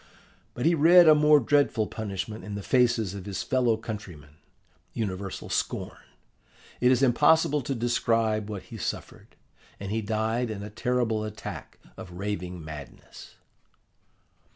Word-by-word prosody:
But 125 - -3
he 170 - +5
read 170 +2 +7
a 155 - +9
more 150 0 +5
dreadful 140 -4 +2
punishment 105 0 -5
in 105 -1 -6
the 100 - -5
faces 120 -6 +2
of 100 -2 -8
his 95 -2 -3
fellow 125 -4 +1
countrymen: 100 -10 -8 0.6
universal 100 -3 -4
scorn. - - -3 0.8
It 125 +1 +4
is 130 +1 +3
impossible 150 +3 +4
to 135 +2 -3
describe 115 -2 0
what 100 -3 -6
he - - -10
suffered, - - -6 0.4
and 100 0 -6
he 110 +1 -1
died 110 +3 -1
in 105 -2 -5
a 105 - -8
terrible 115 -1 -1
attack 105 0 -8 0.2
of 90 - -9
raving 90 -3 -5
madness. 75 -4 -11
110 Hz, 140 wpm, -27 LUFS, 100-125 Hz, 0.8 s, a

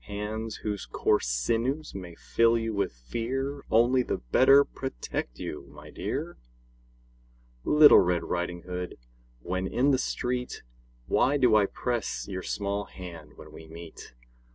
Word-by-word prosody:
Hands 105 +2 -4
whose 105 -10 -3
coarse - - +1
sinews 115 - -1
may 90 -3 -8
fill 115 0 +2
you 115 -1 -2
with 100 -2 0
fear 125 - -4
Only 120 +3 +4
the - - -2
better 130 - +5
protect 95 - -5
you, 75 - -6
my - - -13
dear! - - -4 1.2
Little 150 0 +8
Red 90 -1 +1
Riding 90 0 -3
Hood, 90 -1 -5 0.5
when 95 +2 -2
in 135 +8 +2
the 130 - +2
street, 125 -1 -3 0.4
Why 140 - +2
do 125 -5 +4
I 105 -2 +5
press 120 0 -3
your 95 -2 -4
small 100 +1 -2
hand 85 -6 -10
when - - -12
we 80 - -12
meet? 80 -5 -11
105 Hz, 140 wpm, -28 LUFS, 90-125 Hz, 1.2 s, Little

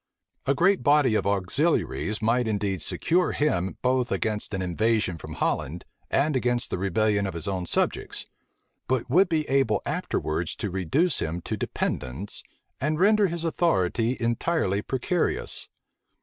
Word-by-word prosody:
A 140 - +3
great 190 +5 +3
body 145 -5 +4
of 110 - +1
auxiliaries 105 - 0
might 120 +2 +2
indeed 100 -4 -1
secure 175 - +1
him 95 -11 0
both 125 -1 +1
against 105 -1 -1
an - - -2
invasion 100 -1 0
from - - -8
Holland, 80 +6 -2 0.2
and 150 +1 +2
against 120 -1 0
the - - -2
rebellion 100 +1 +1
of 95 - -5
his 85 +3 -3
own 95 -3 -2
subjects; - - -1 0.6
but 130 -2 -1
would 185 +1 +5
be 155 -2 0
able 135 -6 +2
afterwards 80 +2 -2
to 105 - -4
reduce 95 - +1
him 80 +2 -2
to - - -3
dependence, 65 +12 -3 0.4
and 155 +3 0
render 210 +1 +5
his 170 -1 -3
authority 125 - +1
entirely 115 - 0
precarious. 135 +9 0
115 Hz, 145 wpm, -26 LUFS, 95-150 Hz, 0.6 s, would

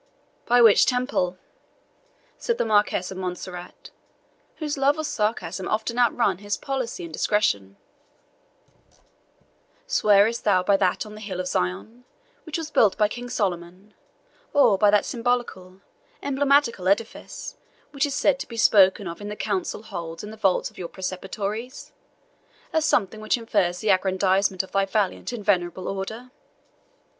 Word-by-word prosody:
"By 245 0 +5
which 220 -3 +6
Temple?" 250 -8 0 1.0
said 470 -1 -1
the - - 0
Marquis 205 -4 +1
of 190 - -7
Montserrat, 180 -1 -7 0.6
whose 300 -2 -3
love 280 +2 +2
of 310 - -3
sarcasm 190 - -2
often 225 +3 -1
outran 235 -6 +2
his 205 0 -3
policy 260 -8 -4
and 165 -2 -8
discretion; 100 - 0 2.1
"swearest 210 +3 +3
thou 185 -3 +3
by 200 +2 +3
that 190 +2 +1
on 210 - -10
the 215 - -10
hill 190 -4 -5
of 185 - -2
Zion, 180 - -3 0.4
which 315 - -3
was 320 -2 -6
built 210 -8 +3
by 210 - +4
King 245 +3 -7
Solomon, 190 -2 -3 0.6
or 280 -8 +5
by 205 +1 +4
that 205 0 +3
symbolical, 230 -6 -2 0.4
emblematical 280 -7 +2
edifice, 225 - -2 0.3
which 285 0 0
is 280 - -4
said 275 -2 +2
to - - -6
be 230 - -9
spoken 195 -2 +5
of 170 +3 -7
in 205 - -6
the 210 - -5
councils 210 +1 -3
held 165 -3 -6
in 210 - -7
the - - -9
vaults 195 -4 +1
of - - -16
your 175 -2 -5
Preceptories, 200 +6 -5 0.8
as 320 -1 +2
something 215 -4 +1
which 215 +3 +1
infers 200 -6 0
the 215 - +2
aggrandizement 190 0 +2
of 190 - -13
thy 195 0 +1
valiant 200 +1 -1
and 225 -4 -7
venerable 185 -2 0
Order?" 220 +6 -5
205 Hz, 150 wpm, -24 LUFS, 185-235 Hz, 2.1 s, which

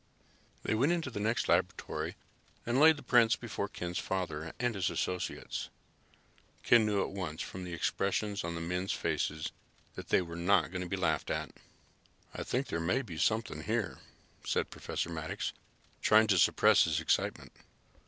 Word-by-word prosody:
They - - 0
went 130 +9 +3
into 165 -6 -2
the 105 - -4
next 115 +3 0
laboratory - - 0 0.5
and 120 +3 +1
laid 160 +1 +7
the - - -10
prints 115 -2 +5
before 110 -3 -4
Ken's 90 -2 -4
father 85 -4 -3
and 120 -1 +1
his 95 -3 0
associates. 90 0 -3 0.9
Ken 115 -2 +5
knew 100 -2 +2
at - - -5
once, 90 -5 -4
from 95 0 -7
the 90 - -6
expressions 100 +4 -1
on 85 0 -3
the 85 - -4
men's 90 +3 -1
faces, 75 0 -2 0.4
that - - -9
they 95 - +4
were 85 -1 -8
not 85 +2 +2
going 90 -1 -3
to 90 - -5
be 95 - -1
laughed 80 -5 0
at. - - -2 0.8
"I - - -5
think 130 +3 -1
there 85 - -3
may 90 +11 +1
be 85 -8 -7
something 110 -8 0
here," 110 +1 -2 0.4
said - - -1
Professor - - -3
Maddox, 80 -1 -3 0.5
trying 110 +1 +6
to 95 -3 +4
suppress - - +5
his 80 -1 +1
excitement. 80 - 0
95 Hz, 170 wpm, -32 LUFS, 85-110 Hz, 0.9 s, laid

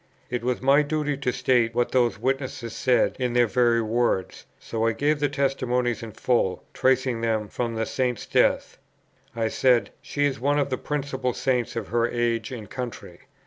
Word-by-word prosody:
It 120 -2 -2
was 125 +1 -1
my 140 +2 +5
duty 150 -1 -1
to 130 -3 -1
state 120 -2 +1
what 120 0 +1
those 120 -4 +2
witnesses 130 -1 -3
said 125 -2 +2
in 125 -2 -1
their 120 0 +4
very 120 0 +2
words; 110 -4 -1
so 115 0 -2
I 115 - +2
gave 145 +4 +1
the 145 -1 +1
testimonies 125 -3 0
in 115 -1 -7
full, 100 -5 0
tracing 130 -2 +1
them 110 -2 0
from 115 +1 -3
the 110 0 -1
Saint's 125 -2 -2
death. - - +1 0.6
I 115 -1 0
said, 125 +1 +2
"She 145 0 -1
is 135 -5 -1
one 145 +3 +1
of 140 -1 0
the 130 - 0
principal 135 -3 -2
Saints 125 -2 -1
of 115 - -4
her 120 0 +1
age 120 0 -1
and 115 -5 -7
country." 125 +3 -7
125 Hz, 185 wpm, -25 LUFS, 115-130 Hz, 0.6 s, my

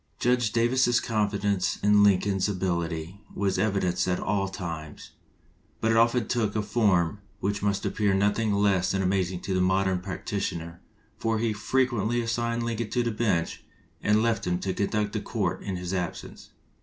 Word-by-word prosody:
Judge 120 -3 +2
Davis's 120 +1 +3
confidence 100 -3 0
in 105 0 +5
Lincoln's 100 0 +3
ability 85 -1 -2
was 95 -2 0
evidenced 95 -3 +1
at 90 -1 0
all 100 -1 0
times, 85 -5 -7 0.7
but 115 - +1
it - - +3
often 115 0 +3
took 110 -4 0
a 110 - 0
form 100 -4 +2 0.2
which 100 +1 -1
must 100 -1 0
appear 100 -2 +1
nothing 105 +2 +1
less 100 -2 +2
than 95 0 0
amaz 95 -1 +1
ing 90 -1 -6
to 95 - -3
the 95 - +2
modern 95 0 +2
practitioner, 90 -3 -4 0.4
for 115 0 0
he 110 0 0
frequently 120 0 0
assigned 115 0 -1
Lincoln 115 -1 -2
to 125 - 0
the 120 - -1
bench 105 -7 -1 0.4
and 105 +1 +3
left 115 -5 0
him 90 0 +1
to 95 - -1
conduct 105 +1 -1
the 110 - -2
court 95 -6 -2
in 95 - -4
his 90 +1 -4
absence. 90 -3 -5
100 Hz, 170 wpm, -27 LUFS, 95-110 Hz, 0.7 s, in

